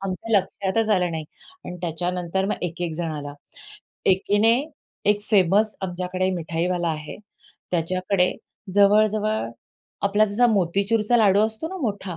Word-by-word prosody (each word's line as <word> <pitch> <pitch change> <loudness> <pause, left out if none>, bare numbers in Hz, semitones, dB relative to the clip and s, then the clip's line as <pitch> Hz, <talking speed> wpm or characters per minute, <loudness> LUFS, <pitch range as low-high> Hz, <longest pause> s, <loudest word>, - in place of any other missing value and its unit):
आमच्या 195 +3 0
लक्षातच 195 +3 -2
आलं 180 -4 +2
नाही. 160 -1 -4 0.4
अन् 180 - -6
त्याच्यानंतर 180 +2 -2
मग - - -3
एक-एक 175 -1 -3
जण 165 -1 -3
आला. 145 -1 -6 0.7
एकीने 205 +4 +3 0.6
एक 205 0 +1
फेमस 205 +1 +2
आमच्याकडे 185 0 -2
मिठाईवाला 170 +1 -1
आहे, 150 -1 -5 0.5
त्याच्याकडे 180 +2 +1 0.4
जवळ-जवळ 210 - +3 0.5
आपला 205 +2 +3
जसा 215 +4 +2
मोतीचूरचा 210 +3 +1
लाडू 205 -3 +4
असतो 220 +9 -5
ना 380 - -6
मोठा? 200 -6 -3
190 Hz, 125 wpm, -23 LUFS, 175-210 Hz, 0.7 s, लाडू